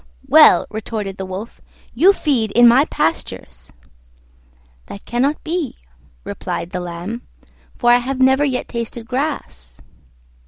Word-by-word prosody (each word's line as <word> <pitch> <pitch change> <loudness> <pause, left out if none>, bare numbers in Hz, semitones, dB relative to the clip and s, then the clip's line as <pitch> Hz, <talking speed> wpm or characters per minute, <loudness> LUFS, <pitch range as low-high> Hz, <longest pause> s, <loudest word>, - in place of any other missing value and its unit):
"Well," - - +6
retorted 210 -2 -5
the 190 - -6
Wolf, 190 +4 -8 0.3
"you 335 +12 +5
feed 270 - 0
in 240 0 +7
my 255 +5 +5
pastures." 65 - -4 1.2
"That 200 - -10
cannot 265 +5 -1
be," 325 -4 -3 0.5
replied 170 - -5
the 180 - -3
Lamb, 180 +6 -6 0.6
"for 240 -1 +3
I 240 - +7
have 255 +2 -4
never 265 +2 +4
yet 260 -3 -1
tasted 235 -1 -6
grass." 245 - -5
235 Hz, 125 wpm, -19 LUFS, 190-265 Hz, 1.2 s, in